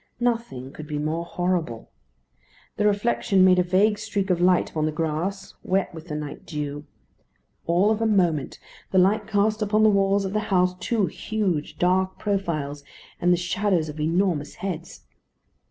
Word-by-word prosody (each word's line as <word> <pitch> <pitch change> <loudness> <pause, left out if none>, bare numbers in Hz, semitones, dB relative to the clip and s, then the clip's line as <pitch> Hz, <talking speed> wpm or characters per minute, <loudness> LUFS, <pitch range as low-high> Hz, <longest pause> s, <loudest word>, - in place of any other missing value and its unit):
Nothing 230 - -2
could 155 - -9
be 150 -1 -3
more 155 +3 -2
horrible. 170 -9 -2 0.9
The 210 - +3
reflection 205 -2 +2
made 185 -1 +5
a - - +4
vague 205 +4 +2
streak 205 -3 -2
of 175 -1 +1
light 180 0 +3
upon 155 -1 0
the - - -1
grass, 165 +5 -3
wet 190 -1 0
with 160 +1 -10
the 150 - -4
night 150 -1 -6
dew. 145 -2 -5 0.8
All 180 +5 +3
of 220 0 0
a 225 - +2
moment 175 -9 +1 0.3
the 190 - 0
light 200 +3 +3
cast 215 +1 +1
upon 215 +1 +2
the 215 - +7
walls 195 0 +2
of 190 - -4
the 215 - +1
house 180 -2 +3
two 225 -5 +1
huge 190 -8 -2
dark 185 +1 +1
profiles, 155 -8 -2 0.4
and 175 - +3
the 175 - +4
shadows 180 -2 0
of 150 +1 -8
enormous 165 -1 0
heads. 175 -3 -6
185 Hz, 170 wpm, -24 LUFS, 160-200 Hz, 0.9 s, the